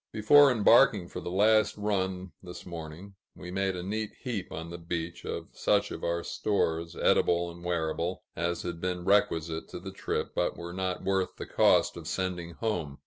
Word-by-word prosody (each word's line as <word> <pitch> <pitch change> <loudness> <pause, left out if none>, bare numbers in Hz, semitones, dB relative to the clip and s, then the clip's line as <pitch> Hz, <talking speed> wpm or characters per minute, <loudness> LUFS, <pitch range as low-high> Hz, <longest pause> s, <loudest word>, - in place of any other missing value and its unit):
Before 135 +6 +6
embarking 110 -4 +5
for - - -6
the - - -5
last 105 +4 +3
run, 95 -3 -2
this 90 -1 -10
morning, 85 +3 -8 0.2
we 90 0 -8
made 95 0 0
a 90 - -5
neat 105 +3 -2
heap 110 -7 -4
on 80 +1 -6
the 85 - -7
beach, 85 0 -4
of - - -5
such 100 0 +1
of - - -7
our 85 0 -1
stores, 85 -5 -1
edible 85 0 +2
and 85 +1 -13
wearable, 85 +1 -2
as 85 +1 -2
had 85 -1 -5
been 90 -1 -2
requisite 80 -5 +1
to - - -7
the 95 +2 -7
trip, 95 - -3
but - - -1
were 85 0 -7
not 95 0 -3
worth 95 -1 0
the - - -6
cost - - +3
of - - -8
sending 90 -2 -3
home. 85 -11 -3
90 Hz, 185 wpm, -29 LUFS, 85-100 Hz, 0.2 s, Before